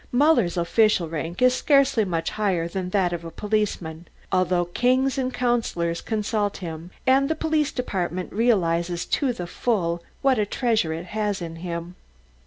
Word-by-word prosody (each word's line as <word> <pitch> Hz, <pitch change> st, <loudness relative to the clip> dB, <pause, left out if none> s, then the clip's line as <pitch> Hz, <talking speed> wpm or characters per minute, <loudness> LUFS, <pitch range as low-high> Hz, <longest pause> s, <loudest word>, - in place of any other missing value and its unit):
Muller's 245 Hz, -, +3 dB
official 180 Hz, +1 st, +3 dB
rank 165 Hz, +7 st, -3 dB
is 255 Hz, 0 st, +6 dB
scarcely 275 Hz, -4 st, +3 dB
much 165 Hz, -3 st, -2 dB
higher 190 Hz, -6 st, 0 dB
than 180 Hz, +1 st, -4 dB
that 185 Hz, -2 st, +1 dB
of 170 Hz, -1 st, -4 dB
a 165 Hz, -, -6 dB
policeman, 180 Hz, -5 st, -2 dB, 0.2 s
although 180 Hz, -1 st, +2 dB
kings 255 Hz, +8 st, +1 dB
and 255 Hz, -1 st, -1 dB
councillors 225 Hz, -10 st, -1 dB
consult 210 Hz, -2 st, -1 dB
him 165 Hz, -2 st, -7 dB, 0.2 s
and 270 Hz, +2 st, +4 dB
the 320 Hz, -, +1 dB
Police 310 Hz, -2 st, 0 dB
Department 185 Hz, -7 st, -3 dB
realises 175 Hz, -6 st, +1 dB
to 275 Hz, -4 st, +1 dB
the 180 Hz, -7 st, -5 dB
full 175 Hz, -4 st, -1 dB, 0.2 s
what 265 Hz, -4 st, +3 dB
a 210 Hz, -, +2 dB
treasure 220 Hz, -8 st, +1 dB
it 165 Hz, +2 st, -4 dB
has 210 Hz, -2 st, -1 dB
in 165 Hz, -2 st, -6 dB
him. 170 Hz, 0 st, -5 dB
195 Hz, 160 wpm, -24 LUFS, 170-245 Hz, 0.2 s, is